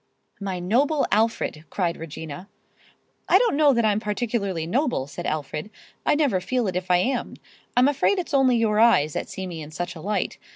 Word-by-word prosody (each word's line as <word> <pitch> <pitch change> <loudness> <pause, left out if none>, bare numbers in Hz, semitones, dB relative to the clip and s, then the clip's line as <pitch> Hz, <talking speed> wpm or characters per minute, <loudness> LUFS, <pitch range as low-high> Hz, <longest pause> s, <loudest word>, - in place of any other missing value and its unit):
"My 195 -2 -3
noble 265 - +2
Alfred!" 215 -7 0
cried 175 -4 -1
Regina. 160 +4 -8 0.8
"I - - +7
don't 475 -11 +2
know 295 -1 +5
that 235 -3 +2
I'm 210 -1 +2
particularly 210 -5 -2
noble," 245 - 0
said 145 - -6
Alfred. 150 +4 -3 0.4
"I - - +4
never 280 -12 +1
feel 250 +5 -1
it 185 - -3
if 185 0 -3
I 180 - +5
am. 245 +7 -1 0.4
I'm 250 +2 +6
afraid 290 +7 +2
it's 355 -5 -4
only 260 -3 +4
your 215 -2 +2
eyes 180 -11 +4
that - - -4
see 190 - -5
me 170 -3 -6
in 150 - -8
such 175 +3 -5
a 160 - -9
light. 205 +4 -2
210 Hz, 195 wpm, -24 LUFS, 175-250 Hz, 0.8 s, I